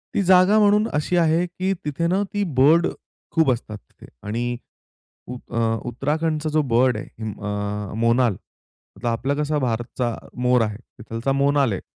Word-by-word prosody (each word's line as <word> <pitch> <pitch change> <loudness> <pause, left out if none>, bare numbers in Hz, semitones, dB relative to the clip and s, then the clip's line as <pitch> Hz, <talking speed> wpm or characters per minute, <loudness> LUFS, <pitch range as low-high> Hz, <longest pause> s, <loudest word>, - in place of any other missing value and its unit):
ती - - +2
जागा 185 +3 +5
म्हणून 210 +1 +4
अशी 150 +4 0
आहे 165 +1 +3
की 185 +2 -2
तिथे 160 +3 -1
ना 190 +3 +1
ती 205 0 0 0.2
बर्ड 160 +5 +5 0.4
खूप 160 -5 +3
असतात 110 -3 -4
तिथे. - - -18 0.2
आणि 120 +2 -2 0.7
अ, 125 - -6
उ - - -6 0.5
उत्तराखंडचा 155 +5 -1
जो 155 0 +2
बर्ड 125 -1 +3
आहे 110 0 -7
अ, 105 0 -3
मोनाल 115 -2 +2 0.7
तर - - -1
आपला 125 +5 0
कसा 150 0 -1
भारतचा 120 -1 -2 0.3
मोर 125 -1 +3
आहे 105 -1 -1 0.2
तिथलचा 115 +4 -3
मोनाल 140 -2 +2
आहे. - - -4
135 Hz, 155 wpm, -22 LUFS, 115-165 Hz, 0.7 s, जागा